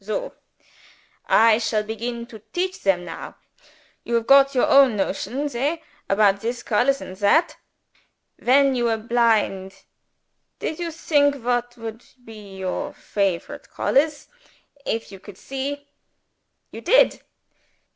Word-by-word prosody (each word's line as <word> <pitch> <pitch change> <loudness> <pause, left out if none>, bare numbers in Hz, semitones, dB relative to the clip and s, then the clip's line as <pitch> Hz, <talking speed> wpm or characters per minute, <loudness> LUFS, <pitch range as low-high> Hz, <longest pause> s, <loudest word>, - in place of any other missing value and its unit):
Soh! 215 +2 -4 0.9
I 225 -1 +5
shall 220 -2 0
begin 235 +2 -5
to 230 -2 -12
teach 370 +2 -2
them 180 -3 +1
now. 165 - -8 0.7
You 235 - -2
have 230 -1 0
got 275 +1 +5
your 250 - +3
own 275 -5 +5
notions 250 +8 -2
hey? 295 +7 -2 0.3
about 200 0 +3
this 240 +2 -4
colors 255 +5 +1
and 185 - -8
that? 205 - +2 0.8
When 275 +2 +4
you 240 -2 0
were 225 -1 +1
blind, 215 -4 0 0.7
did 315 - -4
you 340 -1 -3
think 290 -3 +2
what 245 0 -1
would 225 0 -8 0.2
be 210 -3 -11
your 190 +10 -4
favorite 195 -4 -3
colors 295 +2 0 0.6
if 225 -2 -3
you 195 - -11
could 200 -1 -13
see? 280 +2 -5 0.8
You 225 - -9
did? - - +4
235 Hz, 130 wpm, -22 LUFS, 210-275 Hz, 0.9 s, I